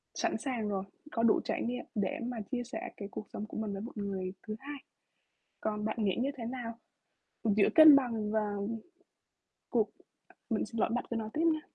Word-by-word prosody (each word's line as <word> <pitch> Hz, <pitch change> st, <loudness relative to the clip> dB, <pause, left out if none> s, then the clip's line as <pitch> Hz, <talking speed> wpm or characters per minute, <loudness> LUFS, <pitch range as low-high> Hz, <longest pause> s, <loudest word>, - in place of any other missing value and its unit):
sẵn -, -, +1 dB
sàng 245 Hz, -7 st, -2 dB
rồi, 195 Hz, -2 st, -1 dB, 0.3 s
có 230 Hz, -, 0 dB
đủ 230 Hz, -, +5 dB
trải -, -, -1 dB
nghiệm 245 Hz, +1 st, -2 dB
để 200 Hz, -3 st, 0 dB
mà 240 Hz, -2 st, -3 dB
chia 245 Hz, -2 st, 0 dB
sẻ 250 Hz, -, -5 dB
cái 200 Hz, -, -5 dB
cuộc 210 Hz, -, -6 dB
sống 210 Hz, -, -3 dB
của -, -, -7 dB
mình 220 Hz, -2 st, -1 dB
với 195 Hz, -, -4 dB
một 230 Hz, -, -7 dB
người 190 Hz, -2 st, -2 dB
thứ 215 Hz, -, -2 dB
hai. 285 Hz, +1 st, -6 dB, 0.8 s
Còn 210 Hz, -1 st, -1 dB
bạn 220 Hz, +1 st, -1 dB
nghĩ 195 Hz, -3 st, +2 dB
như 270 Hz, +3 st, +2 dB
thế 235 Hz, -, -5 dB
nào? 235 Hz, -2 st, -4 dB, 0.7 s
Giữa 210 Hz, -2 st, +5 dB
cân 315 Hz, -3 st, +11 dB
bằng 230 Hz, -6 st, +1 dB
và 215 Hz, -1 st, +1 dB, 1.2 s
cuộc 220 Hz, -3 st, +2 dB, 0.6 s
mình 220 Hz, -, +1 dB
xin 225 Hz, +1 st, -4 dB
lỗi, -, -, +3 dB
bạn 245 Hz, -, 0 dB
cứ 235 Hz, -, 0 dB
nói 220 Hz, -1 st, -3 dB
tiếp 315 Hz, -, +2 dB
nha. 310 Hz, -, -1 dB
225 Hz, 205 wpm, -32 LUFS, 210-245 Hz, 1.2 s, cân